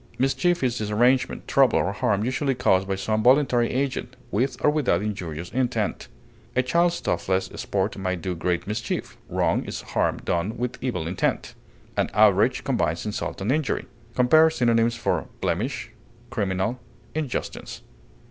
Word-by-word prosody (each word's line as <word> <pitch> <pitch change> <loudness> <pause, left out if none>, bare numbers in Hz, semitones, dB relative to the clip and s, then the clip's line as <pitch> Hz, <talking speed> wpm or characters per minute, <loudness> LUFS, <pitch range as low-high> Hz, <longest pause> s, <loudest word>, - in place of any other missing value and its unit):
Mischief 135 +6 +1
is 125 -1 0
disarrangement, 120 +5 +1
trouble, 135 -4 +4
or 95 - +1
harm 105 0 +1
usually 135 +2 0
caused 95 -6 +2
by 95 - 0
some 110 +3 -1
voluntary 125 -1 +4
agent, 130 -1 -2 0.2
with 125 +4 0
or 150 - +6
without 125 - +1
injurious 90 -6 -4
intent; 120 -5 -1 0.5
a 130 - +3
child's 170 +6 +2
thoughtless 95 +2 -1
sport 100 +1 -1
may 95 -1 -1
do 90 +1 -3
great 90 0 -1
mischief; 105 +2 -3
wrong - - +1
is - - -5
harm - - +1
done 90 +6 -2
with 125 0 -4
evil 105 -11 -2
intent. 90 +3 -1 0.4
An - - +1
outrage 105 +4 +4
combines 85 - 0
insult 105 -2 -4
and 105 +6 0
injury. 150 -1 0 0.3
Compare 155 +6 +6
synonyms 115 -5 +2
for 115 - -1
BLEMISH; - - -2 0.4
CRIMINAL; 100 +2 -1 0.3
INJUSTICE. 150 -5 -4
115 Hz, 145 wpm, -25 LUFS, 95-130 Hz, 0.5 s, or